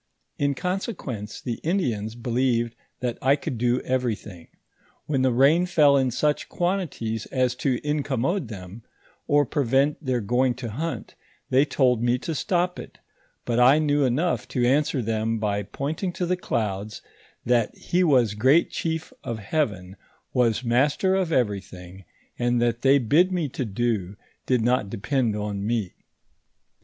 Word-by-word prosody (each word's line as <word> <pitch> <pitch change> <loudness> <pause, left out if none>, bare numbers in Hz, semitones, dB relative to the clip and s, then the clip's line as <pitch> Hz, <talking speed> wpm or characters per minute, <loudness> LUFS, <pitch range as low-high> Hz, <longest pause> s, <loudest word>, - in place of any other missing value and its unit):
In 140 -1 +1
consequence 175 - -4
the 120 -3 -4
Indians 120 - -1
believed 120 -1 0 0.3
that 120 -2 -2
I 135 +2 +4
could 130 -4 -5
do 125 +1 +1
everything; 110 -9 -3 0.6
when 140 -3 0
the 130 -1 +3
rain 145 +9 +4
fell 150 -5 +5
in 130 -2 +2
such 145 +5 0
quantities 165 - -2
as 130 -2 +1
to 130 -3 0
incommode 145 - -1
them, 100 +1 -9 0.5
or 145 0 +4
prevent 140 +3 +1
their 130 -3 0
going 125 +3 +1
to 120 -3 -6
hunt, 160 +8 -4 0.4
they 135 +3 +5
told 125 -5 +2
me 120 +1 +2
to 160 +5 -4
stop 180 +2 0
it; - - -10 0.5
but 120 0 0
I 130 +4 +6
knew 145 -2 +2
enough 130 -1 0
to 125 -1 0
answer 135 0 +2
them 110 +1 -1
by 105 -2 -1
pointing 145 - -3
to 180 - -2
the 180 +1 +1
clouds, 105 - -3 0.4
that 120 -2 +1
he 180 +1 0
was 125 - +3
great 130 +10 +3
chief 160 +7 -3
of 115 - -4
heaven, 100 -6 -2 0.4
was 120 -1 +2
master 140 +10 +2
of 190 -3 0
everything, 95 - -3 0.3
and 120 0 +1
that 120 0 0
they 135 +2 +5
bid 150 - +3
me 170 -5 -1
to 130 0 -3
do, 105 -3 -2 0.3
did 125 -3 +2
not 120 -4 +1
depend 120 +1 -1
on 105 -1 -3
me. 110 -4 -1
125 Hz, 150 wpm, -25 LUFS, 115-145 Hz, 0.6 s, I